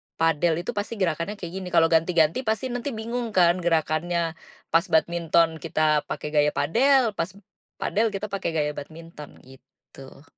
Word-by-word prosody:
"padel 165 Hz, +1 st, +1 dB
itu -, -, -3 dB
pasti 210 Hz, +1 st, -4 dB
gerakannya 180 Hz, +1 st, -1 dB
kayak 175 Hz, -4 st, -8 dB
gini." 185 Hz, -, -7 dB
Kalau 165 Hz, -, +5 dB
ganti-ganti 165 Hz, +3 st, +3 dB
pasti 230 Hz, +4 st, -1 dB
nanti 245 Hz, 0 st, -4 dB
bingung 230 Hz, 0 st, -4 dB
kan 175 Hz, 0 st, +4 dB
gerakannya 165 Hz, 0 st, 0 dB, 0.4 s
pas 165 Hz, +3 st, +3 dB
badminton 165 Hz, -1 st, +2 dB
kita 155 Hz, -1 st, +1 dB
pakai 150 Hz, -, -5 dB
gaya 150 Hz, -1 st, +3 dB
padel, 245 Hz, -, +3 dB
pas 165 Hz, -, -1 dB, 0.5 s
padel 220 Hz, +2 st, +1 dB
kita 200 Hz, +2 st, -4 dB
pakai 195 Hz, -4 st, -2 dB
gaya 150 Hz, -1 st, 0 dB
badminton 155 Hz, 0 st, -10 dB
gitu. 135 Hz, +1 st, -16 dB
170 Hz, 150 wpm, -25 LUFS, 155-205 Hz, 0.5 s, Kalau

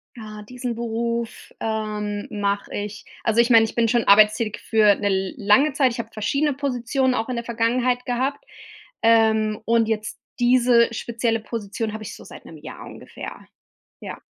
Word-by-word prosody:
Ah, 215 Hz, -2 st, -9 dB
diesen 245 Hz, +1 st, -5 dB
Beruf, 235 Hz, 0 st, -4 dB
ähm, 210 Hz, -2 st, -3 dB
mache 200 Hz, -1 st, -2 dB
ich 205 Hz, 0 st, -5 dB, 0.2 s
also 225 Hz, +1 st, +3 dB
ich 240 Hz, -, 0 dB
meine, 225 Hz, -2 st, +6 dB
ich 220 Hz, -, -6 dB
bin 230 Hz, -1 st, +2 dB
schon 235 Hz, +1 st, +2 dB
arbeitstätig 215 Hz, +1 st, +4 dB
für 215 Hz, -2 st, +4 dB
'ne 205 Hz, -, -2 dB
l 190 Hz, -1 st, -1 dB
lange 215 Hz, +8 st, +3 dB
Zeit. 265 Hz, -4 st, +2 dB
Ich 235 Hz, -, -6 dB
habe 225 Hz, -1 st, -5 dB
verschiedene 280 Hz, +7 st, 0 dB
Positionen 260 Hz, -1 st, -1 dB
auch 225 Hz, +2 st, -2 dB
in 250 Hz, -, -2 dB
der 235 Hz, -, -3 dB
Vergangenheit 245 Hz, +2 st, 0 dB
gehabt, 260 Hz, +3 st, -2 dB, 0.6 s
ähm, 220 Hz, -1 st, +3 dB
und 230 Hz, -1 st, +2 dB
jetzt 215 Hz, -1 st, -3 dB, 0.2 s
diese 240 Hz, -1 st, +4 dB
spezielle 230 Hz, 0 st, -1 dB
Position 220 Hz, 0 st, -5 dB
habe 220 Hz, -, -6 dB
ich 205 Hz, -, -8 dB
so -, -, -13 dB
seit -, -, -13 dB
'nem 160 Hz, -, -11 dB
Jahr 150 Hz, -, -10 dB
ungefähr. -, -, -10 dB, 0.5 s
Ja. -, -, -8 dB
230 Hz, 170 wpm, -22 LUFS, 215-245 Hz, 0.6 s, meine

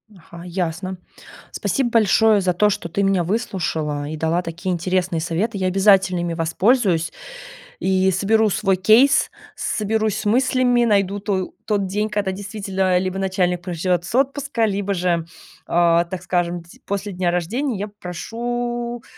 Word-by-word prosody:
Ага. 170 Hz, -1 st, -13 dB
Ясно. 180 Hz, +1 st, -3 dB, 0.6 s
Спасибо 265 Hz, -4 st, -1 dB
большое 220 Hz, -1 st, +4 dB
за 185 Hz, -1 st, +1 dB
то, 210 Hz, +4 st, +3 dB
что 200 Hz, -4 st, -3 dB
ты 200 Hz, +4 st, -1 dB
меня 195 Hz, -2 st, +2 dB
выслушала 160 Hz, -8 st, -2 dB
и 155 Hz, -, -5 dB
дала 160 Hz, +3 st, 0 dB
такие 175 Hz, +2 st, -4 dB
интересные 180 Hz, -1 st, -1 dB
советы, 195 Hz, +6 st, -2 dB
я 185 Hz, -, 0 dB
обязательно 190 Hz, -1 st, +4 dB
ими 170 Hz, -1 st, -2 dB
воспользуюсь 175 Hz, +1 st, +1 dB, 0.7 s
и 190 Hz, 0 st, +2 dB
соберу 215 Hz, +4 st, +2 dB
свой 195 Hz, 0 st, +1 dB
кейс, 225 Hz, +9 st, +4 dB, 0.2 s
соберусь 215 Hz, 0 st, -1 dB
с 215 Hz, -, -5 dB
мыслями, 245 Hz, +1 st, +3 dB
найду 200 Hz, -2 st, +1 dB
то 195 Hz, -2 st, -2 dB
тот 205 Hz, -3 st, 0 dB
день, 210 Hz, +3 st, -1 dB
когда, 205 Hz, -2 st, -1 dB
действительно, 195 Hz, -2 st, -1 dB
либо 185 Hz, +1 st, -2 dB
начальник 185 Hz, -2 st, 0 dB
проживет 175 Hz, -1 st, -1 dB
с 215 Hz, -, -5 dB
отпуска, 275 Hz, -2 st, +1 dB
либо 200 Hz, -1 st, -1 dB
же, 175 Hz, -2 st, 0 dB, 0.4 s
а, 170 Hz, 0 st, +3 dB
так 180 Hz, +1 st, -7 dB
скажем, 175 Hz, -1 st, -1 dB
д 170 Hz, -, -20 dB, 0.2 s
после 200 Hz, 0 st, -3 dB
дня 180 Hz, -1 st, -1 dB
рождения, 220 Hz, -, -1 dB
я 205 Hz, +2 st, -3 dB
попрошу 240 Hz, +5 st, -4 dB
190 Hz, 150 wpm, -21 LUFS, 175-215 Hz, 0.7 s, большое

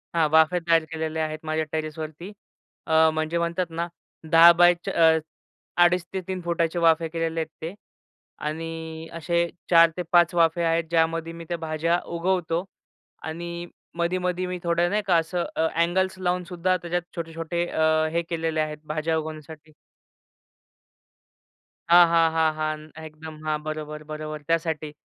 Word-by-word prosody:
हां. 165 Hz, -2 st, +3 dB
वाफे 160 Hz, +3 st, +4 dB
तयार 165 Hz, -1 st, +3 dB
केलेले 160 Hz, 0 st, -3 dB
आहेत 155 Hz, 0 st, -2 dB
माझ्या 155 Hz, 0 st, -1 dB
टेरेसवरती. 155 Hz, +3 st, -5 dB, 0.6 s
अ, 160 Hz, 0 st, +5 dB
म्हणजे 155 Hz, +1 st, -1 dB
म्हणतात 170 Hz, +2 st, -1 dB
ना 170 Hz, +1 st, -2 dB, 0.4 s
10 165 Hz, +1 st, +9 dB
बाय 175 Hz, 0 st, +7 dB
च -, -, -2 dB
अ, 160 Hz, -1 st, +4 dB, 0.7 s
2.5-3 180 Hz, +1 st, 0 dB
फुटाचे 170 Hz, 0 st, 0 dB
वाफे 165 Hz, 0 st, +3 dB
केलेले 165 Hz, 0 st, -2 dB
आहेत 160 Hz, -, -2 dB
ते 165 Hz, +3 st, -5 dB, 0.7 s
आणि 160 Hz, +1 st, -5 dB
असे 170 Hz, +1 st, 0 dB, 0.2 s
4 170 Hz, -1 st, +7 dB
ते -, -, -1 dB
5 175 Hz, -1 st, +5 dB
वाफे 170 Hz, 0 st, +3 dB
आहेत, 165 Hz, 0 st, +2 dB
ज्यामध्ये 165 Hz, 0 st, 0 dB
मी 165 Hz, 0 st, -9 dB
त्या 175 Hz, -, -1 dB
भाज्या 165 Hz, +1 st, 0 dB, 0.2 s
उगवतो 175 Hz, -1 st, 0 dB, 0.7 s
आणि 170 Hz, +1 st, -6 dB, 0.3 s
मधी-मधी 180 Hz, +1 st, -1 dB
मी 180 Hz, 0 st, -4 dB
थोडं 170 Hz, 0 st, +1 dB
नाही 210 Hz, +1 st, +1 dB
का 180 Hz, -, +4 dB
असं 170 Hz, +2 st, -1 dB
अ, 160 Hz, -, +1 dB
अँगल्स 185 Hz, +3 st, +1 dB
लावूनसुद्धा 180 Hz, 0 st, 0 dB
त्याच्यात 175 Hz, 0 st, -3 dB
छोटे-छोटे 165 Hz, 0 st, -3 dB
अ, 155 Hz, -1 st, +2 dB
हे 170 Hz, +1 st, +1 dB
केलेले 165 Hz, -2 st, -1 dB
आहेत, 155 Hz, 0 st, -3 dB
भाज्या 155 Hz, +1 st, -1 dB
उगवण्यासाठी. 155 Hz, 0 st, -8 dB, 2.2 s
हां, 175 Hz, +1 st, +8 dB
हां, 165 Hz, -1 st, +3 dB
हां, 160 Hz, -1 st, +2 dB
हां. 155 Hz, 0 st, -5 dB
एकदम 155 Hz, 0 st, -10 dB
हां, 150 Hz, -1 st, -1 dB
बरोबर, 155 Hz, 0 st, -5 dB
बरोबर, 155 Hz, 0 st, -5 dB
त्यासाठी. 160 Hz, -2 st, -1 dB
165 Hz, 145 wpm, -25 LUFS, 160-170 Hz, 2.2 s, 10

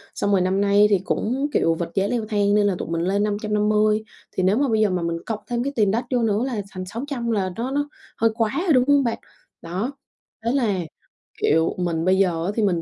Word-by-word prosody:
Xong 205 Hz, -, 0 dB
rồi 195 Hz, -, +3 dB
năm 190 Hz, +2 st, +1 dB
nay 205 Hz, +1 st, +5 dB
thì 200 Hz, -2 st, +3 dB
cũng, 260 Hz, +10 st, -1 dB
kiểu, 165 Hz, -, +3 dB
vật 170 Hz, 0 st, -4 dB
giá 195 Hz, 0 st, +2 dB
leo 235 Hz, -1 st, -1 dB
thang 205 Hz, -1 st, +2 dB
nên 205 Hz, -1 st, +3 dB
là 195 Hz, -, +1 dB
tụi -, -, -5 dB
mình 165 Hz, 0 st, -1 dB
lên 195 Hz, +4 st, +1 dB
550. 210 Hz, 0 st, +1 dB, 0.3 s
Thì 185 Hz, -, -2 dB
nếu 190 Hz, +4 st, +3 dB
mà 280 Hz, +1 st, +2 dB
bây 220 Hz, -1 st, +2 dB
giờ 215 Hz, -, +3 dB
mà 180 Hz, -1 st, -1 dB
mình 170 Hz, 0 st, -1 dB
cộng 220 Hz, -2 st, -3 dB
thêm 240 Hz, 0 st, -1 dB
cái 280 Hz, +2 st, -3 dB
tiền 210 Hz, -4 st, +3 dB
đất 235 Hz, +4 st, -1 dB
vô 250 Hz, -2 st, +2 dB
nữa 215 Hz, 0 st, +1 dB
là 235 Hz, -6 st, -2 dB
thành 185 Hz, -1 st, -6 dB
600 235 Hz, +3 st, -4 dB
là 190 Hz, -4 st, 0 dB
nó 240 Hz, +5 st, -3 dB
nó 290 Hz, +1 st, -1 dB, 0.3 s
hơi 225 Hz, -, +3 dB
quá 225 Hz, -2 st, +1 dB
rồi, 335 Hz, -, +4 dB
đúng 255 Hz, -2 st, +5 dB
hông 285 Hz, -1 st, +4 dB
bạn? 235 Hz, -2 st, -1 dB, 0.4 s
Đó, 185 Hz, +10 st, -3 dB, 0.5 s
thế 235 Hz, -, +2 dB
là, 230 Hz, -8 st, +1 dB, 0.6 s
kiểu, 160 Hz, +2 st, +2 dB
mình 170 Hz, -2 st, -1 dB
bây 185 Hz, +1 st, +4 dB
giờ 175 Hz, -4 st, +1 dB
á, 195 Hz, -, 0 dB
thì 225 Hz, -, +1 dB
mình 175 Hz, -5 st, +1 dB
210 Hz, 250 wpm, -23 LUFS, 185-235 Hz, 0.6 s, nay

